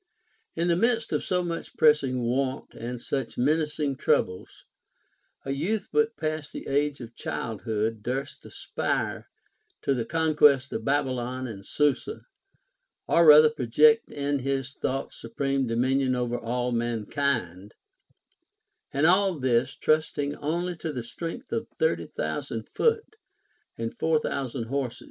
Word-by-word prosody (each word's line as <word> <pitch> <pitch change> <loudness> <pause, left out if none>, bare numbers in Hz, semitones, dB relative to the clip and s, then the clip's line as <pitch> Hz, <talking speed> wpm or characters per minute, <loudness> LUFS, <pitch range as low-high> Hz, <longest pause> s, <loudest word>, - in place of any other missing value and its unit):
In 170 +1 0
the 170 - +3
midst 230 +3 +1
of - - 0
so 180 -1 0
much 170 -1 -5
pressing 140 -5 +3
want 130 +2 -1
and 120 +1 -6
such 135 0 -4
menacing 150 0 0
troubles, 90 -8 -1 0.8
a 135 - -2
youth 180 +11 -1
but 225 0 +1
new 155 - 0
past 155 -1 -4
the - - -7
age 145 0 0
of 120 0 -9
child 115 -1 -4
hood 110 0 -1
durst 130 +5 -4
aspire - - -3 0.5
to 140 - +2
the 120 -3 -1
concμlest 150 -3 +3
of 110 - -3
Babylon 130 -2 -1
and 105 -5 -7
Susa, 150 - -1 0.8
or 170 -1 +5
rather 150 0 +9
project 150 +2 +4
in 140 0 -1
his 135 0 -2
thoughts 135 -1 -4
supreme 135 +3 -1
dominion 130 +3 +1
over 120 -1 -1
all 125 +1 -2
mankind; 115 -4 -2 1.2
and 140 +3 +1
all 185 +1 +4
this, 130 -1 +1
trusting 150 -2 0
only 170 +4 -2
to 160 - -4
the 125 -5 -4
strength 165 - -7
of - - -2
thirty 480 0 +1
thousand - - -4
foot 455 -2 0 0.6
and 115 0 -4
four 160 -1 +2
thousand 130 -4 -3
horse. 130 +1 -3
140 Hz, 140 wpm, -27 LUFS, 125-155 Hz, 1.2 s, rather